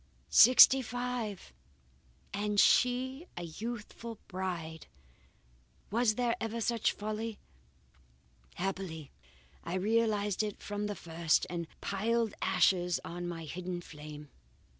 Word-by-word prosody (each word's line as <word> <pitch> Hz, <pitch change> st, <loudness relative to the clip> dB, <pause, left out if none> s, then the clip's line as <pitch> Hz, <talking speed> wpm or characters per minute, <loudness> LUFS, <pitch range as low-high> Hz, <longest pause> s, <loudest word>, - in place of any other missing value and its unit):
Sixty 255 Hz, +2 st, +9 dB
five! 245 Hz, -4 st, -4 dB, 0.8 s
and 205 Hz, 0 st, 0 dB
she 260 Hz, -, +3 dB
a 175 Hz, -, -4 dB
youthful 225 Hz, +5 st, -6 dB
bride! 175 Hz, -4 st, -5 dB, 1.0 s
Was 225 Hz, 0 st, +2 dB
there 240 Hz, -1 st, +1 dB
ever 225 Hz, +1 st, -3 dB
such 230 Hz, 0 st, +1 dB
folly! 215 Hz, +1 st, -4 dB, 1.2 s
Happily 180 Hz, -5 st, -4 dB, 0.5 s
I 170 Hz, -, -4 dB
realized 210 Hz, 0 st, +1 dB
it 210 Hz, -2 st, -4 dB
from 205 Hz, 0 st, -4 dB
the 205 Hz, -, -4 dB
first, 165 Hz, -2 st, +1 dB
and 170 Hz, -2 st, -3 dB
piled 225 Hz, +2 st, 0 dB
ashes 180 Hz, -2 st, +2 dB
on 175 Hz, +1 st, -5 dB
my 165 Hz, -2 st, -5 dB
hidden 180 Hz, +3 st, -5 dB
flame. 150 Hz, -3 st, -10 dB
205 Hz, 105 wpm, -32 LUFS, 175-230 Hz, 1.2 s, Sixty